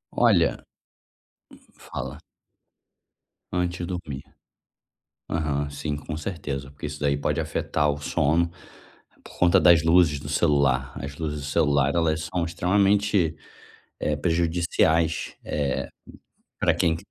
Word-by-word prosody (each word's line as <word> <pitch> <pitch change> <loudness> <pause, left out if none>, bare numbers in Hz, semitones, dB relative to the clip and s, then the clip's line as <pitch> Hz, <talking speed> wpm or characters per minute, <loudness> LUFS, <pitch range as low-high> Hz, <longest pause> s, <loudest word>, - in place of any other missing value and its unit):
Olha - - +3 1.0
Hum, - - -28
fala. 65 +2 -6 1.4
Antes 90 0 -1
de 90 - -3
dormir. 80 -7 -5 1.1
Aham. 75 -3 -1
Sim, 75 +1 -3
com 75 +1 -6
certeza. 70 -5 -5
Porque 70 +1 -7
isso 75 0 -7
daí 70 -1 +1
pode 70 - -1
afetar 75 -1 0
o 75 0 -4
sono, 80 +4 +1 0.8
por - - -14
conta 90 -1 +5
das 85 -3 +6
luzes 80 -3 +4
do - - -8
celular. 65 -3 +2
As 70 0 -6
luzes 75 -2 -3
do 70 - -6
celular 70 -1 +2
elas 80 -1 0
são 85 -2 +1
extremamente, 95 0 +2 0.6
eh, 75 - 0
prejudiciais, 80 0 +1
eh, 70 -3 -2 0.7
pra - - +3
quem 80 -1 +1
80 Hz, 125 wpm, -25 LUFS, 70-85 Hz, 1.4 s, das